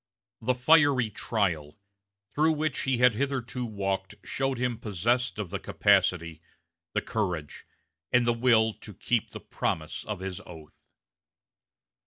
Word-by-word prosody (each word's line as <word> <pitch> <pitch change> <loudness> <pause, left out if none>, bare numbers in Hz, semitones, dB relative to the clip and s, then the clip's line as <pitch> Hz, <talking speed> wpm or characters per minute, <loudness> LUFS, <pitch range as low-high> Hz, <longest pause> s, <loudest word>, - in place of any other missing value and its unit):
"The 125 +3 +1
fiery 135 -3 +4
trial" 90 -9 -1 0.6
through 155 +2 +3
which 155 0 -1
he 135 -2 0
had 125 -1 +5
hitherto 125 0 -2
walked 100 -1 -3
showed 135 -1 -1
him 120 -2 -1
possessed 115 +4 0
of 105 -5 -4
the - - -2
capacity, 90 -5 +2 0.5
the - - 0
courage, 90 -11 -3 0.4
and 125 -1 +4
the 120 - +3
will 115 -2 +3
to 105 - -10
keep 115 +3 0
the - - -8
promise 80 -1 -3
of 105 - -4
his 95 -1 -5
oath. 80 -2 -12
110 Hz, 135 wpm, -28 LUFS, 95-125 Hz, 0.6 s, had